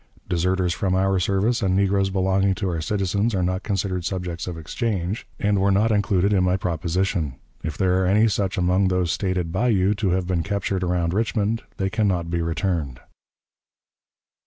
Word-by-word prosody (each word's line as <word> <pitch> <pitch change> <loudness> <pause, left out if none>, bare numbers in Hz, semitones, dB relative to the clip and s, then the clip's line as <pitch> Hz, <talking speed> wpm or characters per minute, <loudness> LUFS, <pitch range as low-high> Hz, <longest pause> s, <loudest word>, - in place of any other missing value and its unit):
Deserters 90 0 +1
from 95 0 0
our 95 0 +2
service 100 +7 +1
and 95 -3 +1
negroes 100 0 +2
belonging 95 0 +1
to 95 +1 -2
our 85 -3 -2
citizens 100 +3 0
are 90 - +1
not 90 +1 -1
considered 95 -3 -2
subjects 90 -2 -4
of 90 -2 -5
exchange, 95 +2 -3
and 100 -1 +1
were 100 - +3
not 105 +3 +3
included 100 -1 +2
in 95 -2 +3
my 90 +1 +2
proposition. 85 -3 -1 0.3
If 80 -2 -4
there 95 0 +2
are 95 - +1
any 105 +4 +4
such 100 -3 -1
among 90 +2 +2
those 90 -2 +1
stated 95 -4 -1
by 120 +8 +1
you 100 -3 +3
to 105 -2 -1
have 90 0 0
been 90 -2 0
captured 100 0 -2
around 85 -1 0
Richmond, 110 +1 0 0.2
they 95 0 -1
can 110 -2 +1
not 85 -3 -1
be 85 0 0
returned." 80 -5 -2
95 Hz, 185 wpm, -23 LUFS, 90-100 Hz, 0.3 s, any